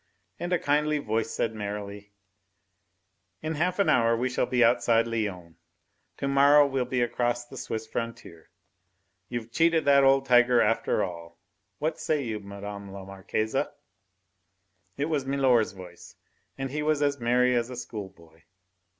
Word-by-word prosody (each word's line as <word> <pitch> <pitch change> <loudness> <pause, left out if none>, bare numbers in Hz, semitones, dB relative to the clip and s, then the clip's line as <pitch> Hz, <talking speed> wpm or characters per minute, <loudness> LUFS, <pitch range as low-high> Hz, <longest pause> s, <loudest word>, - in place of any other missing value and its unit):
And 175 +1 -4
a 180 - +3
kindly 150 0 +1
voice 115 -5 -2
said 115 - -2
merrily: 105 -1 -6 1.3
"In 155 +1 -2
half 175 +4 -1
an 200 - +2
hour 115 -1 +3
we 125 +2 0
shall 125 - 0
be 125 -1 +2
outside 115 -1 +3
Lyons. 100 -7 -4 0.6
To 140 - -3
morrow 140 +1 +6
we'll 135 -2 -1
be 125 0 -1
across 120 0 -1
the 135 - -13
Swiss 110 -3 -5
frontier. 110 -8 -7 0.8
We've 120 -1 -5
cheated 165 +3 +2
that 140 -1 +5
old 135 0 +4
tiger 125 -1 +5
after 115 0 +1
all. 85 -2 -7 0.4
What 155 +1 -2
say 150 -3 0
you, 110 -3 -4
Mme. 100 0 -8
la 95 0 -9
Marquise?" 95 +3 -3 1.4
It 140 - 0
was 150 -4 -2
milor's 130 -6 +2
voice, 90 -2 -12 0.4
and 135 -1 -4
he 150 +2 -2
was 150 -1 +1
as 140 -1 0
merry 125 +1 +2
as 120 0 0
a 125 - -7
school 105 -5 -6
boy. 80 -3 -22
120 Hz, 155 wpm, -27 LUFS, 105-140 Hz, 1.4 s, morrow